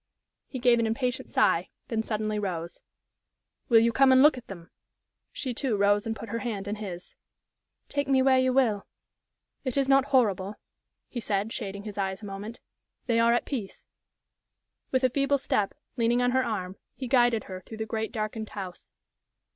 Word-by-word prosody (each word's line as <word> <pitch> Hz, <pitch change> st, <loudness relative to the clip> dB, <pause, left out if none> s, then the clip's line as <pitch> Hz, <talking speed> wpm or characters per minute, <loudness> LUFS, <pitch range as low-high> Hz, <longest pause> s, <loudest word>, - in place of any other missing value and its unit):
He 265 Hz, -, -6 dB
gave 245 Hz, -1 st, +4 dB
an 230 Hz, -, +1 dB
impatient 250 Hz, +2 st, -2 dB
sigh, -, -, +2 dB, 0.2 s
then 225 Hz, -3 st, 0 dB
suddenly 215 Hz, -1 st, -2 dB
rose. 175 Hz, -4 st, -4 dB, 0.9 s
"Will 230 Hz, -2 st, +7 dB
you 235 Hz, +1 st, +3 dB
come 270 Hz, +1 st, +5 dB
and 260 Hz, +1 st, +7 dB
look 300 Hz, -1 st, +7 dB
at 250 Hz, -, -10 dB
them?" 170 Hz, -4 st, -10 dB, 0.6 s
She, 260 Hz, -4 st, -4 dB
too, 240 Hz, -3 st, -1 dB
rose 205 Hz, +1 st, +3 dB
and 225 Hz, -, -2 dB
put 225 Hz, +1 st, -8 dB
her 230 Hz, +2 st, -2 dB
hand 210 Hz, -5 st, -4 dB
in 210 Hz, +1 st, -3 dB
his. 180 Hz, -4 st, -7 dB, 0.7 s
"Take 285 Hz, -1 st, -2 dB
me 265 Hz, -1 st, +4 dB
where 260 Hz, -1 st, +5 dB
you 255 Hz, 0 st, +3 dB
will." 235 Hz, -6 st, +2 dB, 0.8 s
"It 255 Hz, -1 st, -3 dB
is 275 Hz, -1 st, +2 dB
not 270 Hz, 0 st, +5 dB
horrible," 210 Hz, -7 st, +1 dB, 0.5 s
he 245 Hz, -, -5 dB
said, 210 Hz, -1 st, -1 dB
shading 200 Hz, -3 st, -5 dB
his 205 Hz, -1 st, -6 dB
eyes 190 Hz, +2 st, -2 dB
a -, -, -5 dB
moment. 205 Hz, +3 st, -7 dB, 0.4 s
"They 230 Hz, -2 st, +2 dB
are 230 Hz, 0 st, +5 dB
at -, -, 0 dB
peace." 230 Hz, -9 st, -5 dB, 1.0 s
With 260 Hz, 0 st, +1 dB
a 255 Hz, -, +5 dB
feeble 280 Hz, +1 st, +2 dB
step, 210 Hz, -6 st, -1 dB, 0.2 s
leaning 235 Hz, +1 st, +2 dB
on 245 Hz, 0 st, +2 dB
her 260 Hz, +1 st, +2 dB
arm, 190 Hz, -5 st, -3 dB, 0.2 s
he 260 Hz, -, -5 dB
guided 240 Hz, -3 st, +3 dB
her 185 Hz, -1 st, -8 dB
through 220 Hz, -, -10 dB
the 220 Hz, -, -3 dB
great, 220 Hz, 0 st, -3 dB
darkened 215 Hz, -1 st, -4 dB
house. 185 Hz, -3 st, -8 dB
225 Hz, 185 wpm, -27 LUFS, 205-255 Hz, 1.0 s, Will